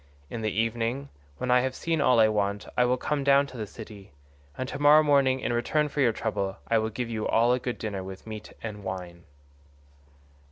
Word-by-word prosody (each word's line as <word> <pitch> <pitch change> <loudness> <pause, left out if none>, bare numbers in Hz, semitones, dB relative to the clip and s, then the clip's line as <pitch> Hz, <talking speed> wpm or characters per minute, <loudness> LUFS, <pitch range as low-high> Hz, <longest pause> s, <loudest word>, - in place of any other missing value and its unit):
In 115 - -4
the 110 - 0
evening, 115 +5 -1 0.3
when 125 +9 -1
I 125 - +6
have 130 0 -2
seen 165 -2 -1
all 125 -4 +4
I 110 - +7
want, 105 -1 -1
I 125 - +4
will 125 +1 +2
come 145 +2 -1
down 140 0 +5
to 130 -2 -11
the 110 -2 -4
city, 105 -3 -11 0.5
and 130 - -3
to 145 - -6
morrow 150 +1 +7
morning 135 -3 +3
in - - -1
return 150 +6 +1
for 145 - -2
your 120 -4 +4
trouble 100 -3 -3
I 115 - +3
will 110 0 -1
give 120 +2 -4
you 110 -1 -2
all 120 +2 +3
a 125 - +1
good 125 -1 -4
dinner 100 -3 -4
with 95 0 -9
meat 110 -1 -8
and 105 -2 -6
wine." 90 -2 -6
115 Hz, 215 wpm, -27 LUFS, 105-130 Hz, 0.5 s, I